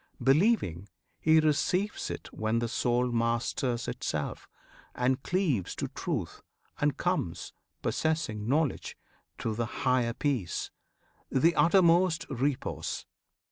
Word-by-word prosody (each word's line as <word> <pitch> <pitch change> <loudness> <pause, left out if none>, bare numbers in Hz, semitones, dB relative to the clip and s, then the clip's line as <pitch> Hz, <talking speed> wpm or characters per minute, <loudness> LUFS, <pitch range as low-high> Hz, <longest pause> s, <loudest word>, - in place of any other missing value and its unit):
Believing, 135 - +2 0.3
he 160 0 +5
receives 180 +6 +1
it - - -7
when 110 +1 0
the 120 0 0
soul 120 +1 +1
Masters 120 +1 0
itself, - - -3 0.5
and 130 +1 +1
cleaves 160 - 0
to - - -3
Truth, - - -4 0.4
and - - +1
comes - - -2 0.3
Possessing 155 -10 -1
knowledge 150 0 0 0.4
to 110 - -2
the 115 +1 -2 0.2
higher 125 -2 +2
peace, 125 - -2 0.6
The 165 +6 +3
uttermost 170 -1 +4
repose. 135 +1 -2
130 Hz, 105 wpm, -29 LUFS, 115-160 Hz, 0.6 s, he